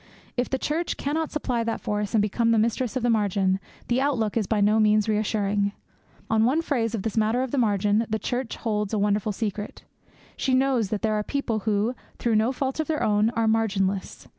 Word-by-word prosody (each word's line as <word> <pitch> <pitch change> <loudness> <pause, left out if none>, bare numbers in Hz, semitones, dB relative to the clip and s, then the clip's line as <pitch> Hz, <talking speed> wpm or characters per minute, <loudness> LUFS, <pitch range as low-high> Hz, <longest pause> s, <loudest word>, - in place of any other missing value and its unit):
If 245 0 -1
the 265 - 0
Church 315 +6 -2
cannot 310 +2 -1
supply 250 -6 -1
that 230 0 -2
force, 210 0 -2
and 210 - +4
become 230 +3 +1
the 230 - +4
Mistress 230 +3 0
of 255 - -1
the 240 - +2
Margin, 195 -3 +1 0.3
the 245 +2 +1
outlook 245 -7 0
is 220 -4 0
by 220 - +1
no 210 +2 +4
means 215 0 +3
reassuring. 205 -1 0 0.5
On 220 0 +2
one 280 +8 +2
phase 230 -7 0
of 200 - -4
this 225 - -3
matter 225 +3 +2
of 260 - -4
the 280 - +1
margin 210 0 +2
the 220 - 0
Church 245 +2 -3
holds 210 -2 -2
a - - +1
wonderful 205 +1 +1
secret. 210 0 -4 0.5
She 260 -1 +1
knows 260 -5 +2
that 215 +1 -3
there 220 -1 +2
are 210 - +1
people 235 -4 -2
who, 210 +3 +1 0.2
through 235 -2 0
no 220 +4 +2
fault 265 +2 -3
of 315 - 0
their 315 -1 -1
own, 210 +1 +3
are 225 0 +1
marginless. 200 -4 0
220 Hz, 215 wpm, -25 LUFS, 210-245 Hz, 0.5 s, and